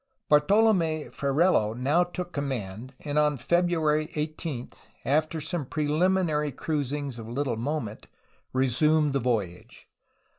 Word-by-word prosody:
Bartolome 165 0 +3
Ferrelo 140 - +2
now 145 +8 +3
took 175 0 -6
command, 130 -4 -4
and 150 0 0
on 150 -1 +2
February 155 0 +1
18, 150 -4 -4 0.3
after 155 +3 +1
some 160 +1 -3
preliminary 155 0 +1
cruisings 145 -4 -3
of 115 0 -8
little 130 0 -1
moment, 115 -2 -4 0.4
resumed 145 +4 +2
the 140 - +2
voyage. 105 -8 -3
150 Hz, 110 wpm, -27 LUFS, 130-160 Hz, 0.4 s, Bartolome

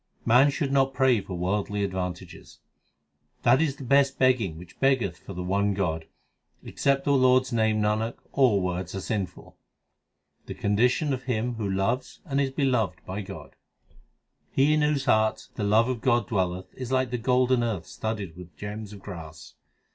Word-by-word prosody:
Man 125 +5 +6
should 140 -1 -2
not 135 -1 +2
pray 130 -5 +3
for 95 -1 -7
worldly 100 +3 -1
advantages: 90 -2 -5 0.9
That 130 - +5
is 145 -4 0
the 140 - -9
best 140 +1 +3
begging 120 -11 +2
which 85 +1 -13
beggeth 125 -10 +2
for 100 - -9
the 90 - -4
one 100 +2 +1
God; 80 -5 -1 0.6
Except 140 0 0
the 145 - +2
Lord 130 -1 +5
s 130 - -9
name, 110 -2 +2
Nanak, 105 +2 0 0.2
all 120 -8 +3
words 90 0 -3
are - - -2
sinful. 95 -3 -5 0.9
The - - -6
condition 125 +8 +1
of 130 -1 -5
him 120 -1 -1
who 110 -4 -3
loves 115 +7 -1
and 140 -3 0
is 135 - +1
beloved 130 -6 0
by 95 +3 -4
God: 95 - -10 0.9
He 140 +3 +3
in 155 - +2
whose 150 -2 +1
heart 110 0 +1
the - - -4
love 110 +3 +4
of 125 -3 -3
God 120 -5 +2
dwelleth 95 -3 -2
is 130 -1 -7
like 130 -1 +1
the 125 - -2
golden 125 0 +2
earth 105 -8 -2
studded 105 -7 -5
with 85 -4 -12
gems 105 +2 -6
of 100 - -12
grass. 80 -6 -9
110 Hz, 175 wpm, -26 LUFS, 95-130 Hz, 0.9 s, Man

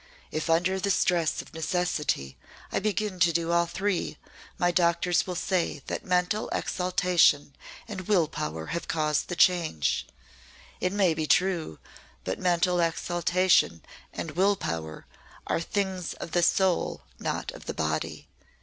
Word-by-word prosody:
If 155 +1 -3
under 180 +4 +2
the 200 - -1
stress 175 -4 +1
of - - -19
necessity 160 - -1 0.4
I - - +1
begin 205 -1 -1
to 170 0 +5
do 165 0 0
all 170 0 +3
three, 190 -3 -2 0.4
my 175 0 +2
doctors 175 0 +2
will 180 - -3
say 175 -5 -1
that - - -4
mental 180 +4 0
exaltation 180 -6 +2 0.3
and 190 -5 -6
will 180 -7 +3
power 80 - -4
have 170 - -3
caused 150 -2 0
the 175 - -4
change. 165 - +2 0.7
It 180 - 0
may 195 -4 +3
be 155 -1 -2
true, 175 - +1 0.5
but 95 - -3
mental 180 0 +2
exaltation 175 - +2 0.3
and 165 - -5
will 195 +6 +3
power 80 - -5 0.4
are - - 0
things 190 -1 -2
of 170 - -7
the 175 - +2
soul 185 +1 +2 0.2
not 475 - -3
of - - -12
the - - -2
body. - - -2
175 Hz, 145 wpm, -27 LUFS, 160-185 Hz, 0.7 s, to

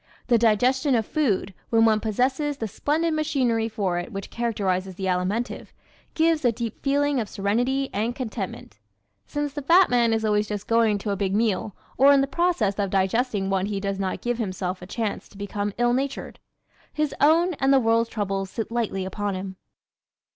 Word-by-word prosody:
The 235 -2 +5
digestion 250 +5 +3
of 225 -2 +1
food, 205 -11 0 0.2
when 225 -1 +4
one 220 -1 +4
possesses 265 +7 0
the 225 - -3
splendid 310 - 0
machinery 255 -8 0
for 195 -5 -1
it 175 - -6
which 195 -2 -6
characterizes 195 -5 -1
the 190 - -4
Alimentive, 190 +6 -2 0.4
gives 320 -1 +2
a 240 - +4
deep 230 -1 -5
feeling 285 0 +1
of 215 -3 -3
serenity 245 +7 0
and 225 +4 -1
contentment. 210 - -6 0.5
Since 290 -1 -3
the 290 - -4
fat 345 +5 +5
man 240 -2 +3
is 220 0 0
always 210 0 +1
just 205 -2 -4
going 225 -2 +3
to 205 +1 -3
a - - 0
big 195 0 -1
meal 215 -2 0 0.2
or 275 +2 +7
in 275 - +5
the - - +2
process 275 - 0
of 200 -1 0
digesting 195 +1 0
one 190 0 +1
he 205 -1 -2
does 195 0 -3
not 190 -1 -2
give 240 0 -2
himself 185 -3 -3
a 180 - -9
chance 220 +1 -3
to 200 - -16
become 205 0 -3
ill 240 0 +2
natured. 270 +2 -3 0.5
His 305 -1 -1
own 335 +5 +4
and 270 0 +3
the 270 - +6
world's 230 -1 +2
troubles 195 -3 -2
sit 225 +2 -5
lightly 220 -5 -1
upon 200 +1 -3
him. 190 0 -6
225 Hz, 190 wpm, -24 LUFS, 200-265 Hz, 0.5 s, or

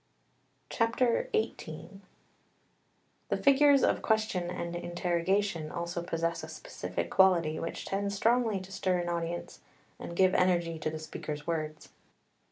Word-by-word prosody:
XVIII 240 - -1 1.3
The - - +1
figures 280 0 +5
of - - +2
question 220 -5 0
and 175 -1 -4
interrogation 175 0 -1
also 170 0 -3
possess 170 0 -2
a - - -7
specific - - -5
quality 170 -5 +4
which 165 - -5
tends 200 +1 -2
strongly 225 -1 +2
to 190 +1 -11
stir 185 -1 0
an 175 0 -2
audience 170 0 -3 0.4
and 170 - -7
give 185 +1 +4
energy 175 -3 +2
to 155 - -1
the 155 - -5
speaker's 150 -1 -6
words. 155 -2 -3
180 Hz, 125 wpm, -30 LUFS, 170-205 Hz, 1.3 s, figures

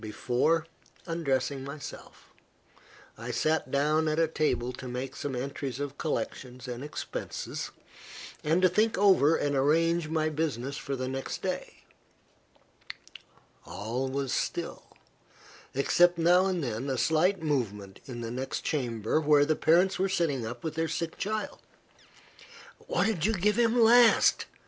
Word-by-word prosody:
Before 125 +9 0 0.4
undressing 140 -5 -1
myself, 140 +2 -10 0.9
I 115 +1 -6
sat 155 +4 0
down 150 +3 +2
at 155 0 0
a 165 0 +3
table 140 -6 -1
to 130 - -8
make 125 +2 -5
some 140 -2 -4
entries 135 0 -4
of 145 0 -5
collections 130 -4 -4
and 125 +1 -5
expenses, 150 - -5 0.7
and 165 +5 +2
to - - +8
think 215 +5 +1
over 185 -6 +5
and 145 -1 0
arrange 165 +4 +2
my 155 -1 0
business 140 -4 -2
for 140 -1 -4
the 130 -1 -3
next 135 +1 -5
day. - - -4 1.8
All 110 +9 -4
was 135 0 -2
still, - - -3 0.9
except 175 +6 +4
now 175 +3 +4
and 180 -4 -1
then 120 +2 -3
a 130 - -1
slight 165 +6 +2
movement 105 -10 -2
in 120 -3 -6
the 115 0 -5
next 130 +2 -4
chamber, 120 -1 -1
where 145 -1 +5
the 155 +1 +1
parents 180 +5 +3
were 190 +1 +1
sitting 150 -11 0
up 120 +1 -7
with 160 - -3
their 165 0 -1
sick 165 0 -3
child. 215 +1 -3 1.3
"What - - +1
did 205 -5 +1
you 225 - +1
give 210 +3 +1
him 235 +1 +3
last?" 235 +1 +5
150 Hz, 145 wpm, -29 LUFS, 130-165 Hz, 1.8 s, to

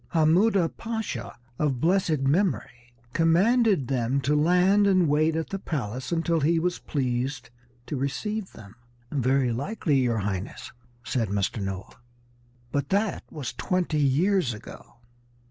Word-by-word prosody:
Hammuda 170 +3 +4
Pasha, 220 - -5 0.2
of 140 -5 0
blessed 165 -2 +2
memory, 125 - -1 0.2
commanded 185 - +3
them 130 0 0
to 140 +3 +1
land 180 +6 +4
and 185 -4 +4
wait 155 +2 +2
at 160 0 -3
the 195 - -3
palace 130 - -4
until 165 0 +1
he 160 +3 +2
was 175 +2 -1
pleased 125 -2 -2 0.3
to 150 - -4
receive 195 +10 -3
them." 100 -2 -13 0.4
"Very 130 -2 +1
likely, 145 - -1
your 120 -3 +1
Highness," 100 -2 -4 0.3
said 120 -3 -1
Mr. 100 +2 -1
Noah, 95 0 -5 0.7
"but 140 +1 -1
that 200 +1 0
was 135 -6 -5
twenty 180 -4 -1
years 145 - +2
ago." 105 - -12
150 Hz, 130 wpm, -26 LUFS, 125-180 Hz, 0.7 s, Hammuda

